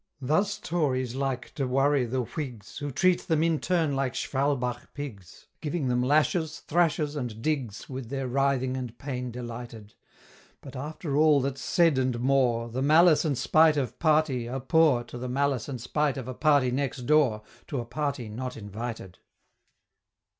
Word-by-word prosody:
Thus 175 +10 +1
Tories 135 - -1
like 135 -2 -3
to 135 -3 -2
worry 135 +1 +2
the 125 +2 -1
Whigs, 120 - -7
Who 145 -1 -3
treat 180 +6 +1
them 160 -2 +2
in 165 -2 +2
turn 165 -6 +1
like 135 -2 -1
Schwalbach 130 -3 -1
pigs, 110 - -8 0.2
Giving 150 -3 -2
them 125 0 +1
lashes, 155 +3 +1
thrashes, 155 -3 +1
and 120 -6 -4
digs, 125 -6 -2
With 130 -3 -6
their 135 -1 -3
writhing 130 0 +1
and 125 -3 -5
pain 125 -3 -4
delighted 120 -3 -8 0.7
But 135 -1 -11
after 145 +2 -4
all 150 -1 +5
that's 135 0 -3
said, 165 -6 +3
and 130 -2 0
more, 125 -3 +2
The 125 +3 -3
malice 155 +3 +5
and 145 -5 0
spite 155 +2 +4
of 130 -6 -2
Party 150 -7 +2
are 130 +2 -3
poor 145 -2 +3
To 120 - -9
the 125 +1 -4
malice 140 -1 0
and 130 -3 -4
spite 145 +3 0
of 130 -2 -5
a 130 - -4
party 145 -3 +3
next 135 0 -2
door, 125 -6 +3 0.2
To 140 - -3
a 120 - -4
party 140 0 -3
not 125 +4 -5
invited. 105 -2 -7
135 Hz, 170 wpm, -27 LUFS, 125-150 Hz, 0.7 s, all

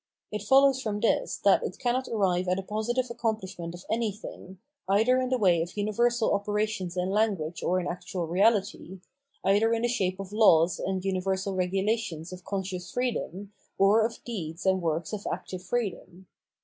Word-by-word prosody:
It 210 -1 -3
follows 270 +4 +5
from 210 -4 -2
this, 235 - +1
that - - +6
it - - -4
cannot 250 +1 -1
arrive 185 -4 +1
at 180 +1 +1
a 195 - -3
positive 220 +5 -1
accompHshment 215 -7 -3
of 175 - -12
anything, 210 -4 -4 0.3
either 225 +6 +4
in 255 - -1
the 255 - +2
way 180 -7 +3
of 175 +4 -5
universal 230 +3 +1
operations 205 -3 -1
in 180 +1 0
language 195 -6 0
or 185 +1 +1
in 180 - -4
actual 180 0 -4
reality, 195 0 +1 0.4
either 205 +4 +4
in 230 - -2
the - - +3
shape 190 -6 -1
of 195 +1 -7
laws 175 -6 +5
and 190 0 -2
universal 190 +1 -1
regulations 185 -2 -1
of 180 -1 -10
conscious 185 -3 -4
freedom, 210 -5 -3 0.2
or 205 +3 +5
of 225 +1 -3
deeds 175 -7 -6
and 190 -1 +3
works 165 +1 -2
of 205 -1 -4
active 185 -1 -5
freedom. 190 -3 -4
195 Hz, 170 wpm, -28 LUFS, 180-225 Hz, 0.4 s, that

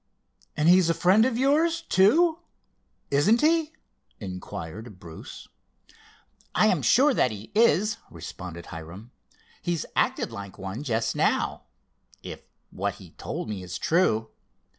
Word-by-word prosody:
"And 150 +1 +2
he's 180 -1 +6
a 165 - +2
friend 195 +5 +4
of 255 -3 0
yours, 320 +6 +2
too; 320 - +3 0.7
isn't 190 +12 +3
he?" 320 0 +2 0.5
inquired 95 +1 -8
Bruce. 80 -3 -11 1.1
"I - - +4
am 185 -8 +2
sure 265 - +4
that 130 - +2
he 105 -1 -9
is," 215 -1 +3
responded 85 -2 -9
Hiram. 90 +8 -10 0.5
"He's 175 -3 -2
acted - - 0
like 100 -1 -8
one 95 +6 -6
just 115 -5 -1
now, - - 0 0.6
if - - -8 0.3
what - - -3
he - - -14
told - - -6
me 105 -3 -5
is 90 -1 -6
true. 110 -11 +1
155 Hz, 130 wpm, -26 LUFS, -, 1.1 s, he's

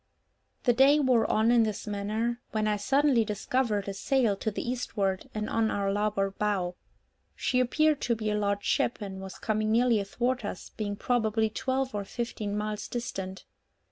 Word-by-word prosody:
The 245 - +4
day 275 +5 +6
wore 255 -5 +3
on 220 +2 +3
in 240 -1 +5
this 215 -3 -1
manner, 215 +4 -2
when 215 -1 +1
I 210 - +2
suddenly 270 +2 +3
discovered 210 0 -1
a 200 - -2
sail 235 +1 +1
to 220 - -1
the 215 - -5
eastward, 205 -6 -2
and 215 0 -2
on 225 -1 +1
our 200 -1 0
larboard 205 -1 -1
bow. 195 -4 0 0.6
She 250 - +1
appeared 305 +4 +2
to 235 - +1
be 215 -1 -2
a - - 0
large 205 -1 0
ship, - - +1
and 195 -2 -6
was 190 -1 -8
coming 215 -1 0
nearly 235 -1 +4
athwart 240 +5 -1
us, 200 -3 -6
being 205 -2 -3
probably 220 -1 +1
twelve 260 +3 -1
or 205 -1 -2
fifteen 210 -1 -4
miles 210 0 -3
distant. 195 -6 -5
215 Hz, 175 wpm, -28 LUFS, 205-245 Hz, 0.6 s, day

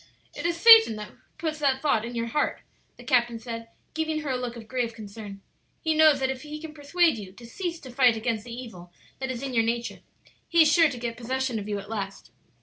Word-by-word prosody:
"It - - -3
is 340 -1 -1
Satan 450 - +8
who 210 0 -8 0.3
puts 310 -1 -3
that 275 -3 +2
thought 250 -7 +2
in 240 +1 -6
your 230 0 -1
heart," 290 +6 -1 0.4
the - - -12
captain 240 -3 +2
said, 230 0 -7 0.3
giving 315 -1 -1
her 290 -3 -3
a - - 0
look 250 -1 -4
of 225 -2 -10
grave 240 -2 -2
concern; 205 -2 -9 0.4
"he 320 - 0
knows 310 -2 +5
that 265 0 0
if 260 -1 -6
he 300 +1 -7
can 315 -1 -9
persuade 310 -1 +1
you 195 -3 -9
to 235 +4 -13
cease 340 +7 -5
to 260 - -10
fight 245 -2 +4
against 220 -1 -2
the 240 - -10
evil 225 -8 -9 0.3
that 265 0 -3
is 255 0 -4
in 270 -2 -4
your 230 - +4
nature 235 +1 -2 0.5
he 335 -1 +6
is 305 - +3
sure 330 -3 +6
to 255 - -6
get 235 -1 -4
possession 255 0 -2
of 205 0 -7
you 205 - -1
at 200 0 -8
last. 195 - -6
250 Hz, 240 wpm, -26 LUFS, 230-300 Hz, 0.5 s, Satan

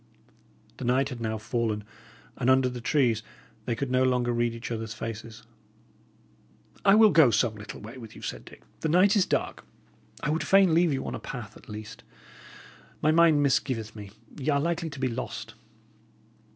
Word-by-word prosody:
The - - -7
night 130 +3 +2
had 125 -3 -7
now 110 -1 -2
fallen, 110 -1 -2 0.5
and 125 - 0
under 130 0 +4
the 125 -1 -7
trees 120 -4 +2 0.4
they 120 - -1
could 125 +2 -3
no 130 0 +3
longer 125 -2 +2
read 120 0 0
each 115 +1 -7
other's 110 -1 -4
face. 115 -1 -7 1.4
"I 195 0 +6
will 215 -1 +7
go 160 -6 +6
some 110 +1 +2
little 105 0 -9
way 115 +5 -9
with 115 -3 -11
you," - - -12
said - - -5
Dick. - - -15 0.2
"The 160 - -1
night 185 +6 +5
is 195 -3 +3
dark. - - -2 0.6
I 150 - 0
would 160 - 0
fain 195 -3 +5
leave 170 0 +4
you 135 -1 -2
on - - -4
a - - -4
path, 120 -6 -8
at - - -16
least. 105 0 -9 1.0
My 155 - +3
mind 160 -2 +5
misgiveth 125 -5 0
me, 105 -2 -9 0.3
y' 140 - -2
are 140 -1 +3
likely 165 +2 -1
to 145 - -9
be 130 - +1
lost." 125 +1 -5
125 Hz, 185 wpm, -27 LUFS, 115-150 Hz, 1.4 s, will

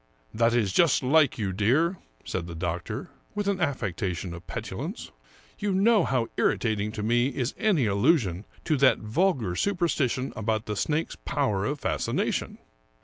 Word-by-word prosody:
" - - -37
That 115 +1 +4
is 105 -6 +1
just 165 - +4
like 145 +1 +4
you, 100 -4 -2
dear," 140 - +2 0.3
said 85 -2 -3
the 85 - -7
doctor, 85 0 -4 0.2
with 205 -1 -2
an 200 -1 +1
affectation 95 - -2
of 85 +1 -10
petulance. - - -5 0.2
" - - -28
You 205 -1 0
know 205 0 +4
how 125 -4 0
irritating 105 -2 +1
to 105 - -4
me 120 +3 +2
is 130 -2 -2
any 200 - +2
allusion 100 - +2 0.2
to 155 - +1
that 135 -1 +5
vulgar 115 - 0
superstition 155 - 0
about 110 0 -1
the 105 - -3
snake's 155 +9 -1
power 120 -9 -1
of 145 0 -3
fascination." - - -1
120 Hz, 160 wpm, -27 LUFS, 100-155 Hz, 0.3 s, that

